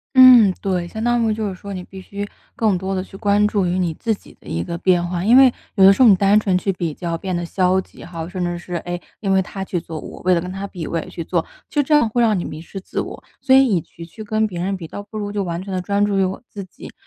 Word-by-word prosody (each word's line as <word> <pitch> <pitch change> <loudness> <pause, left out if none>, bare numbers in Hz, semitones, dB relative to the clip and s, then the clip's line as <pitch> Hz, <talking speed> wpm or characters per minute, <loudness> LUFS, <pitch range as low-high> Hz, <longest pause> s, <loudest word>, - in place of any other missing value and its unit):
嗯， 250 -6 +9
对。 180 -3 -1
相 220 +5 -6
当 240 +1 +2
于 225 -2 +1
就 215 -1 -2
是 190 - -5
说， 200 +2 -9
你 185 - -5
必 190 - -12
须 200 +2 -6 0.3
更 215 -4 +1
多 190 +2 -3
地 185 - -1
去 195 - -12
关 205 0 +2
注 205 -3 0
于 180 +1 0
你 175 -3 0
自 225 +6 -1
己 - - -17
的 - - -22
一 85 +1 -2
个 170 - -4
变 175 0 +2
化。 175 +1 -3
因 230 +4 +5
为 265 -1 +8 0.3
有 195 - +6
的 - - +10
时 195 - +2
候 245 - +8
你 200 - +8
单 200 +2 +4
纯 195 -3 +1
去 195 - -1
比 170 -3 -3
较 170 +2 -4
变 185 +2 -4
得 175 - -1
消 185 +1 +2
极 - - -14
哈， 165 -2 -6
甚 185 -1 -3
至 175 0 -2
是， 175 0 -8
诶， 175 0 -4 0.2
因 195 -2 0
为 190 - +4
他 190 +1 -5
去 180 -2 -3
做， 160 -1 -7
我 - - -10
为 185 0 +3
了 170 - +1
跟 180 +2 -6
他 195 +1 -5
比， 180 -5 -7
我 165 - -2
也 - - -6
去 165 - -6
做， 170 -1 0 0.3
就 290 - +2
这 300 +2 +1
样 295 -5 +5
会 240 - 0
让 220 -4 +3
你 175 - -3
迷 155 +1 -7
失 185 +4 -9
自 190 - -4
我。 - - -7 0.2
所 265 0 +5
以 270 0 +6
与其 170 -5 -2
去 195 +6 -11
跟 215 +1 0
别 175 -4 -6
人 195 +2 -1
比， 170 -3 -8
倒 205 - -7
不 205 +2 -12
如 205 -1 -4
就 205 -1 -1
完 175 -1 -4
全 195 0 -7
地 185 - -1
专 200 +3 +1
注 205 -1 0
于 195 - +3
我 190 +5 -4
自 200 - -7
己。 185 - -12
190 Hz, 330 characters per minute, -20 LUFS, 175-210 Hz, 0.3 s, 的